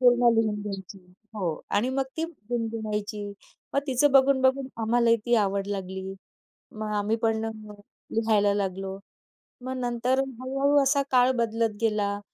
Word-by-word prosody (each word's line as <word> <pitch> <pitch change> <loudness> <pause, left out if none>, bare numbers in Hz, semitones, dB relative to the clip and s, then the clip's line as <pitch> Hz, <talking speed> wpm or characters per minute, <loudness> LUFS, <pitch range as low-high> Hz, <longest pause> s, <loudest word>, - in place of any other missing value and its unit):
पूर्ण 245 -1 +5
लिहून 220 -2 +2
घ्यायची. 195 -1 -7 0.4
हो 195 -4 -2 0.2
आणि 215 +5 +1
मग 270 0 0
ती 325 - 0 0.3
गुणगुणायची. 215 -3 -3 0.5
मग 280 - +3
तिचं 270 +1 +3
बघून-बघून 265 0 +4
आम्हालाही 230 +1 +3
ती 240 - +3
आवड 200 0 -1
लागली. 190 -1 -4 0.6
मग 215 -1 -4
आम्ही 205 +2 +1
पण 225 0 +1 0.7
लिहायला 215 -3 +3
लागलो. 195 -1 -3 0.6
मग 260 +1 -4
नंतर 245 +1 0 0.2
हळू-हळू 275 +3 +1
असा 280 +1 +3
काळ 255 0 +5
बदलत 225 -1 0
गेला. 205 -2 0
225 Hz, 130 wpm, -26 LUFS, 205-255 Hz, 0.7 s, पूर्ण